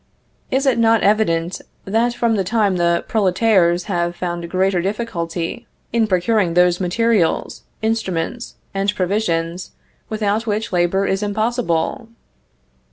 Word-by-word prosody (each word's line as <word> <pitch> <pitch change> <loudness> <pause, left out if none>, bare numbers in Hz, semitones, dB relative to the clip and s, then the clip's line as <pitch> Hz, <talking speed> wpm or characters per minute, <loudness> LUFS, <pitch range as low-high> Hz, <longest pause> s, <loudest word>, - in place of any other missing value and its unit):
Is 270 +2 0
it 255 -4 +2
not 225 -1 +4
evident, 185 -5 +1 0.2
that 230 +4 +1
from 235 -2 +1
that 195 -3 -1
time 210 -3 +1
the 170 0 +1
"prolétaires" 185 -4 +2
have 175 -3 -2
found 175 -1 -4
greater 185 0 +1
difficulty 185 -1 -3 0.3
in 230 -2 +2
procuring 185 -1 +1
those 180 0 +4
materials, 200 0 +1 0.2
instruments, 220 0 -2 0.2
and 200 +1 0
provisions, 180 -3 -1 0.4
without 215 +1 -1
which 210 -1 -2
labor 180 +2 +2
is 195 +1 0
impossible? 215 -2 -1
195 Hz, 120 wpm, -19 LUFS, 175-225 Hz, 0.4 s, not